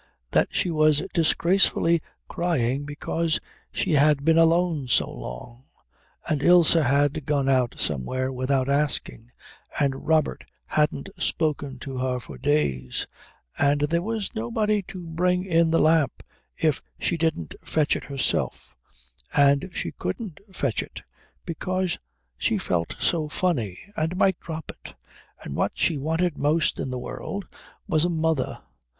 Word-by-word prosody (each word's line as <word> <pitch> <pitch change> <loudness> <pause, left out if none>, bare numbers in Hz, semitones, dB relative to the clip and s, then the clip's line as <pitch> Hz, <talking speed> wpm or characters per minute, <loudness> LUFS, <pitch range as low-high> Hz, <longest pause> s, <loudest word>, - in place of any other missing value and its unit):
that - - +3
she 175 - 0
was 155 0 +3
disgracefully 170 0 +3 0.3
crying 145 -6 0
because 155 +3 -1 0.3
she - - -1
had 145 -1 +4
been 160 0 +5
alone 165 -3 +3
so 120 - +2
long, 65 - -9 0.6
and 150 -3 0
Ilse 175 -1 +7
had 145 -1 +2
gone 140 -2 +1
out 130 -3 +2
somewhere 130 - -1
without 130 +1 0
asking, 140 -4 -1 0.5
and 135 -2 -1
Robert 160 -1 +2 0.2
hadn't 150 +2 0
spoken 145 -4 -1
to 135 -2 -6
her 125 -1 -1
for - - -11
days, 70 - 0 0.5
and 145 0 +3
there 165 +3 +1
was 220 +1 -3
nobody 205 - 0
to 180 -2 -8
bring 180 +3 0
in 165 -2 +3
the 165 - +3
lamp 155 -4 +2 0.3
if 155 -3 +1 0.2
she 175 - 0
didn't 160 - -1
fetch 155 -2 +1
it - - -5
herself, 140 -1 -2 0.6
and 140 +5 +4
she - - -3
couldn't 205 -11 -5
fetch 140 -10 -1
it - - -9 0.4
because 185 +2 -2 0.4
she - - +1
felt 85 -1 -1
so 155 -3 +1
funny 125 - -1 0.2
and 160 +3 -1
might 190 -2 +3
drop 160 -2 -6
it, - - -14 0.5
and 70 - -6
what - - 0
she 165 - +1
wanted 160 +3 0
most 150 +2 +1
in - - -2
the 130 - -3
world 195 +9 -5 0.4
was 155 0 +2
a 175 - +2
mother. 160 -5 -1
150 Hz, 140 wpm, -25 LUFS, 135-170 Hz, 0.6 s, Ilse